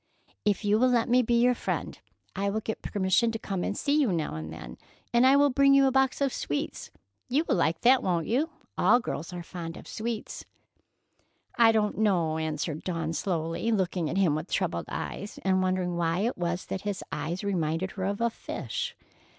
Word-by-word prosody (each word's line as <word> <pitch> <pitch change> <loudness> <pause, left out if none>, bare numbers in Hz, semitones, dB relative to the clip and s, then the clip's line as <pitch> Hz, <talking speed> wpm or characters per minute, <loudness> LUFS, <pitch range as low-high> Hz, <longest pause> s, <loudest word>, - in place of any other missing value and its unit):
"If 205 0 +1
you 210 +1 +3
will 255 +1 +4
let 240 -2 +2
me 250 +1 +5
be 235 0 +2
your 250 +1 +4
friend, - - -3 0.4
I 200 +1 0
will 215 +2 -1
get 220 - -4
permission 200 +4 +1
to - - -1
come 195 -4 -3
and 205 - -2
see 290 +1 +2
you 250 -8 +2
now 160 - -1
and 80 0 -6
then, - - -9 0.3
and 240 +2 +5
I 270 - +6
will 285 0 +5
bring 275 +1 +5
you 275 0 +6
a 265 - +3
box 265 +1 +2
of 275 -2 +1
sweets. 145 - -3 0.4
You 290 +6 +2
will - - +2
like 165 +1 +1
that, 250 +1 +5
won't 170 -3 0
you? 275 +8 +1 0.3
All 215 +7 +5
girls 170 -9 -5
are 175 -1 -6
fond 165 -1 -7
of - - -12
sweets." 225 0 -4 1.1
"I 230 -2 +6
don't 215 -2 0
know," 170 -7 +2
answered 155 0 -3
Dawn 165 -3 -2
slowly, 165 +5 -1
looking 185 -6 0
at - - -2
him 185 -6 +3
with 155 +4 -3
troubled - - -1
eyes, 205 - -5
and 190 -1 +2
wondering 185 -1 0
why 170 +1 0
it 235 +4 0
was 175 0 -2
that 190 - -4
his 205 -2 -3
eyes 165 +6 -3
reminded 180 -2 -1
her 190 -2 -4
of 200 +2 -2
a 235 0 +2
fish. - - -5
195 Hz, 205 wpm, -28 LUFS, 170-235 Hz, 1.1 s, I